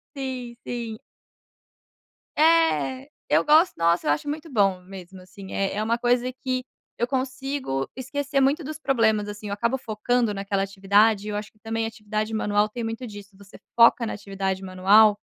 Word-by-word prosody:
Sim, 255 Hz, -3 st, -5 dB
sim. 235 Hz, -3 st, -5 dB, 1.4 s
É, 315 Hz, -4 st, +3 dB, 0.2 s
eu -, -, +4 dB
gosto, 315 Hz, +4 st, +5 dB
nossa 170 Hz, +1 st, +2 dB
eu -, -, +3 dB
acho 150 Hz, -, -1 dB
muito 310 Hz, +2 st, -5 dB
bom 195 Hz, -6 st, +2 dB
mesmo 190 Hz, 0 st, -11 dB
assim 190 Hz, +1 st, -11 dB
é 195 Hz, 0 st, -1 dB
é 210 Hz, -, -1 dB
uma 225 Hz, +2 st, 0 dB
coisa 245 Hz, +1 st, +1 dB
que 255 Hz, 0 st, -3 dB, 0.3 s
eu 240 Hz, -, -1 dB
consigo 260 Hz, -, -3 dB
esquecer 280 Hz, +2 st, -2 dB
muito 280 Hz, +5 st, +2 dB
dos 305 Hz, +2 st, -6 dB
problemas 225 Hz, -8 st, +1 dB
assim 210 Hz, 0 st, -7 dB
eu 200 Hz, -, -3 dB
acabo 235 Hz, +5 st, 0 dB
focando 235 Hz, -1 st, 0 dB
naquela 195 Hz, 0 st, -1 dB
atividade 200 Hz, +2 st, +2 dB
e -, -, -4 dB
eu 205 Hz, -, -3 dB
acho 210 Hz, 0 st, -5 dB
que -, -, -32 dB
também 225 Hz, +1 st, -3 dB
atividade 215 Hz, -1 st, -4 dB
manual 210 Hz, 0 st, +1 dB
tem 235 Hz, +2 st, -5 dB
muito 225 Hz, +2 st, -4 dB
disso, 205 Hz, -2 st, -11 dB
você 200 Hz, 0 st, -15 dB, 0.2 s
foca 235 Hz, 0 st, +6 dB
na 220 Hz, -, -3 dB
atividade 195 Hz, -2 st, -3 dB
manual, 195 Hz, +3 st, +5 dB
220 Hz, 170 wpm, -24 LUFS, 200-255 Hz, 1.4 s, foca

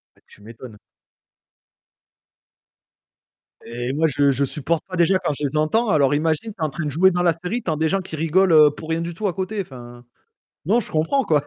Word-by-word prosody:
Bah, -, -, -29 dB
tu -, -, -20 dB
m'étonnes. 115 Hz, 0 st, -12 dB, 2.9 s
Et 120 Hz, +2 st, -4 dB
moi 160 Hz, +3 st, +1 dB
je 140 Hz, -1 st, +2 dB
je 140 Hz, +2 st, 0 dB
supporte 155 Hz, +4 st, -2 dB
pas 185 Hz, -, -6 dB
déjà 175 Hz, +3 st, +3 dB
quand 175 Hz, -5 st, -2 dB
je 150 Hz, -, -4 dB
les 145 Hz, +3 st, -4 dB
entends. 215 Hz, +10 st, +1 dB
Alors 145 Hz, -5 st, +3 dB
imagine, 160 Hz, +8 st, -1 dB
tu 170 Hz, -, -10 dB
es -, -, +3 dB
en 155 Hz, -, -1 dB
train 155 Hz, +2 st, -5 dB
de 145 Hz, -, -2 dB
jouer 185 Hz, +6 st, +4 dB
dans 175 Hz, 0 st, -1 dB
la 170 Hz, -2 st, +3 dB
série, 180 Hz, +9 st, -4 dB
t'en 160 Hz, -3 st, -2 dB
des 160 Hz, +1 st, 0 dB
gens 195 Hz, +2 st, 0 dB
qui 175 Hz, -4 st, -8 dB
rigolent, 165 Hz, +3 st, +2 dB
heu, 150 Hz, -2 st, +7 dB
pour 155 Hz, +2 st, -11 dB
rien 160 Hz, -, 0 dB
du 170 Hz, 0 st, -5 dB
tout 210 Hz, +5 st, -3 dB
à 185 Hz, -, 0 dB
côté. 190 Hz, +4 st, -4 dB
Enfin, 120 Hz, -4 st, -12 dB, 0.6 s
non, 215 Hz, +9 st, +2 dB
je -, -, -10 dB
comprends 160 Hz, -, +1 dB
quoi. 150 Hz, -3 st, +2 dB
160 Hz, 220 wpm, -21 LUFS, 145-185 Hz, 2.9 s, heu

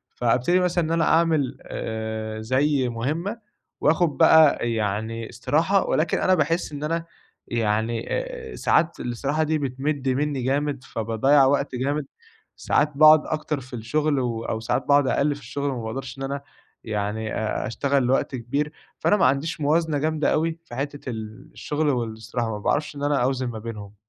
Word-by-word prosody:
فابتدي 125 Hz, +9 st, +2 dB
مثلًا 180 Hz, -1 st, +1 dB
إن 160 Hz, -, -3 dB
أنا 165 Hz, 0 st, +2 dB
أعمل، 160 Hz, -6 st, +2 dB
آآ، 110 Hz, 0 st, -5 dB
زي 130 Hz, +3 st, +1 dB
مهمَّة، 155 Hz, -, -2 dB, 0.4 s
وآخُد 160 Hz, +2 st, +3 dB
بقى 150 Hz, -7 st, +5 dB
يعني 110 Hz, +1 st, -2 dB
استراحة، 165 Hz, -, +1 dB
ولكن 155 Hz, -, +1 dB
أنا 185 Hz, -, +3 dB
باحس 165 Hz, +1 st, 0 dB
إن 145 Hz, 0 st, -6 dB
أنا 165 Hz, +2 st, -1 dB, 0.4 s
يعني، 115 Hz, 0 st, 0 dB
آآ -, -, -4 dB
ساعات 170 Hz, 0 st, +1 dB
الاستراحة 140 Hz, +6 st, -1 dB
دي 155 Hz, 0 st, +1 dB
بتمِد 135 Hz, 0 st, -2 dB
منّي 140 Hz, +1 st, 0 dB
جامد، 140 Hz, 0 st, -1 dB
فباضيَّع 115 Hz, +6 st, +2 dB
وقت 140 Hz, 0 st, +1 dB
جامد، 140 Hz, +4 st, -1 dB, 0.5 s
ساعات 150 Hz, 0 st, +1 dB
باقعد 155 Hz, 0 st, +7 dB
أكتر 155 Hz, -2 st, -2 dB
في 130 Hz, +1 st, -14 dB
الشغل 145 Hz, +6 st, 0 dB
و 115 Hz, -3 st, -2 dB
أو 110 Hz, -, -2 dB
ساعات 115 Hz, -, -1 dB
بعد 140 Hz, -1 st, +5 dB
أقل 145 Hz, +2 st, +1 dB
في 145 Hz, -, -12 dB
الشغل 140 Hz, +3 st, -3 dB
وما 120 Hz, -3 st, -4 dB
باقدرش 130 Hz, +3 st, -5 dB
إن -, -, -4 dB
أنا، 140 Hz, +1 st, -3 dB, 0.4 s
يعني، 110 Hz, 0 st, -3 dB
أ 110 Hz, +3 st, -2 dB
أشتغل 135 Hz, +3 st, 0 dB
لوقت 130 Hz, +1 st, +1 dB
كبير، 140 Hz, +5 st, -2 dB, 0.3 s
فأنا 210 Hz, -, +3 dB
ما -, -, +3 dB
عنديش 145 Hz, +4 st, 0 dB
موازنة 155 Hz, +1 st, +2 dB
جامدة 155 Hz, +1 st, +1 dB
أوي، 165 Hz, +1 st, 0 dB
في 120 Hz, -, -10 dB
حتِّة 140 Hz, 0 st, -4 dB
ال 110 Hz, -2 st, -7 dB
الشغل 150 Hz, 0 st, -1 dB
والإستراحة، 115 Hz, -2 st, -2 dB
ما 105 Hz, -, -4 dB
باعرفش 150 Hz, +7 st, -1 dB
إن 140 Hz, -, -6 dB
أنا 145 Hz, -3 st, +2 dB
أوزِن 130 Hz, 0 st, 0 dB
ما 115 Hz, -2 st, -5 dB
بينهم. 105 Hz, -2 st, -8 dB
140 Hz, 165 wpm, -24 LUFS, 115-155 Hz, 0.5 s, باقعد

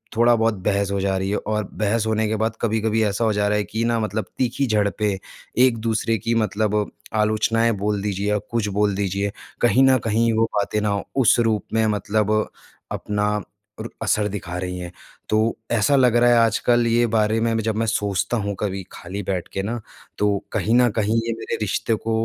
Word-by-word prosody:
थोड़ा-बहुत 115 Hz, -1 st, +4 dB
बहस 100 Hz, -1 st, +1 dB
हो 100 Hz, -, 0 dB
जा 95 Hz, 0 st, 0 dB
रही 95 Hz, +1 st, -2 dB
है 105 Hz, -, +1 dB
और 105 Hz, 0 st, -2 dB
बहस 110 Hz, +1 st, 0 dB
होने 110 Hz, 0 st, +1 dB
के 110 Hz, -, -1 dB
बाद 110 Hz, +1 st, -1 dB
कभी-कभी 110 Hz, -1 st, +1 dB
ऐसा 105 Hz, +2 st, 0 dB
हो 110 Hz, -, +2 dB
जा 105 Hz, 0 st, +1 dB
रहा 105 Hz, 0 st, +1 dB
है 105 Hz, -, 0 dB
कि 110 Hz, +2 st, -3 dB
न 115 Hz, 0 st, +1 dB
मतलब 110 Hz, 0 st, -2 dB
तीखी 130 Hz, +2 st, 0 dB
झड़पें 105 Hz, -2 st, 0 dB, 0.5 s
एक-दूसरे 115 Hz, -2 st, 0 dB
की 115 Hz, +4 st, -1 dB
मतलब 105 Hz, -1 st, 0 dB, 0.3 s
आलोचनाएँ 110 Hz, +2 st, +2 dB
बोल 105 Hz, -1 st, 0 dB
दीजिए 100 Hz, 0 st, -2 dB
या 105 Hz, -, +2 dB
कुछ 115 Hz, -3 st, 0 dB
बोल 105 Hz, -1 st, +2 dB
दीजिए, 100 Hz, 0 st, -1 dB, 0.3 s
कहीं 125 Hz, +2 st, +4 dB
न 130 Hz, -1 st, +5 dB
कहीं 115 Hz, +1 st, +2 dB
वो 110 Hz, +1 st, +3 dB
बातें 105 Hz, +1 st, 0 dB
न 100 Hz, -1 st, 0 dB, 0.2 s
उस 120 Hz, -, +4 dB
रूप 110 Hz, -2 st, +1 dB
में 110 Hz, 0 st, +3 dB
मतलब 105 Hz, +1 st, +1 dB, 0.5 s
अपना 105 Hz, 0 st, -1 dB, 0.5 s
अर -, -, -4 dB
असर 105 Hz, -1 st, +1 dB
दिखा 95 Hz, -3 st, -5 dB
रही 90 Hz, 0 st, -4 dB
हैं। 90 Hz, -1 st, -6 dB, 0.4 s
तो 110 Hz, -, +2 dB, 0.3 s
ऐसा 120 Hz, +5 st, +3 dB
लग 125 Hz, -3 st, +4 dB
रहा 120 Hz, 0 st, +5 dB
है 120 Hz, -, +5 dB
आजकल 115 Hz, +1 st, +3 dB
ये 120 Hz, +1 st, +3 dB
बारे 110 Hz, 0 st, +2 dB
में 115 Hz, 0 st, +1 dB
जब 110 Hz, -1 st, -1 dB
मैं 115 Hz, +1 st, 0 dB
सोचता 105 Hz, +1 st, 0 dB
हूँ 100 Hz, -2 st, -2 dB
कभी 95 Hz, -2 st, -2 dB
खाली 95 Hz, +4 st, -6 dB
बैठ 90 Hz, -2 st, -3 dB
के 95 Hz, -, -1 dB
न, 115 Hz, +4 st, -3 dB, 0.4 s
तो 105 Hz, -1 st, +2 dB
कहीं 110 Hz, +2 st, 0 dB
न 125 Hz, 0 st, +5 dB
कहीं 110 Hz, 0 st, +1 dB
ये -, -, 0 dB
मेरे -, -, -3 dB
रिश्ते 105 Hz, +2 st, 0 dB
को 115 Hz, +1 st, -4 dB
110 Hz, 200 wpm, -22 LUFS, 100-115 Hz, 0.5 s, न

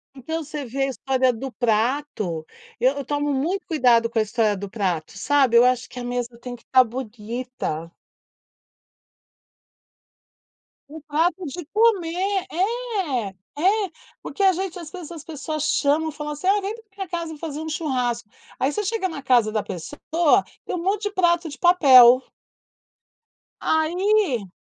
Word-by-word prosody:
Então 320 Hz, +5 st, -4 dB
você 295 Hz, -1 st, -6 dB
vê 270 Hz, +3 st, -2 dB
a -, -, +1 dB
história 260 Hz, -1 st, +1 dB
do 255 Hz, +3 st, -6 dB
prato, 225 Hz, -, -1 dB, 0.3 s
eu 260 Hz, +4 st, +2 dB
eu 280 Hz, -, -4 dB
tomo 290 Hz, 0 st, -1 dB
muito 345 Hz, +9 st, -1 dB
cuidado 245 Hz, -8 st, +3 dB
com 235 Hz, -, -5 dB
a -, -, +5 dB
história 215 Hz, -1 st, +1 dB
do 200 Hz, 0 st, -6 dB
prato, 185 Hz, -4 st, -2 dB
sabe, 270 Hz, 0 st, +3 dB
eu 240 Hz, -, +8 dB
acho 250 Hz, 0 st, +2 dB
que 250 Hz, -, -9 dB
a -, -, -5 dB
mesa 245 Hz, -1 st, -3 dB
tem 245 Hz, 0 st, -7 dB
que 235 Hz, -, -19 dB
estar 255 Hz, -1 st, +5 dB
bonita. 230 Hz, -7 st, -5 dB, 3.0 s
O 315 Hz, +2 st, -9 dB
prato 330 Hz, +4 st, 0 dB
de 345 Hz, +4 st, -6 dB
comer, 390 Hz, -2 st, +1 dB
é, 380 Hz, -, -1 dB, 0.3 s
é, 395 Hz, -1 st, +2 dB, 0.3 s
porque 400 Hz, -, -6 dB
a 385 Hz, -1 st, +6 dB
gente 375 Hz, 0 st, -4 dB
às 330 Hz, -, -8 dB
vezes 345 Hz, -1 st, -9 dB
as 320 Hz, -3 st, -8 dB
pessoas 310 Hz, -1 st, -4 dB
chamam 305 Hz, +3 st, +2 dB
e -, -, -5 dB
falam 300 Hz, 0 st, -5 dB
assim: 330 Hz, +6 st, -5 dB
"Ah, 405 Hz, +1 st, +4 dB
vem 400 Hz, +3 st, -3 dB
pra 455 Hz, -1 st, -12 dB
minha 385 Hz, -1 st, -4 dB
casa 335 Hz, -2 st, -4 dB
fazer 305 Hz, -1 st, -5 dB
um 315 Hz, -, -5 dB
churrasco, 250 Hz, -7 st, -2 dB, 0.3 s
aí 270 Hz, +3 st, +1 dB
você 420 Hz, -, -2 dB
chega 405 Hz, -1 st, -1 dB
na 320 Hz, -6 st, -7 dB
casa 240 Hz, -5 st, +3 dB
da 215 Hz, -1 st, 0 dB
pessoa 295 Hz, -, 0 dB, 0.2 s
e -, -, -3 dB
um 345 Hz, -, -2 dB
monte 390 Hz, +3 st, 0 dB
de 415 Hz, -, -1 dB
prato 345 Hz, -3 st, +2 dB
de 290 Hz, -, -9 dB
papel". 260 Hz, -8 st, +7 dB, 1.4 s
Aí 335 Hz, -, +1 dB
290 Hz, 165 wpm, -23 LUFS, 245-350 Hz, 3.0 s, eu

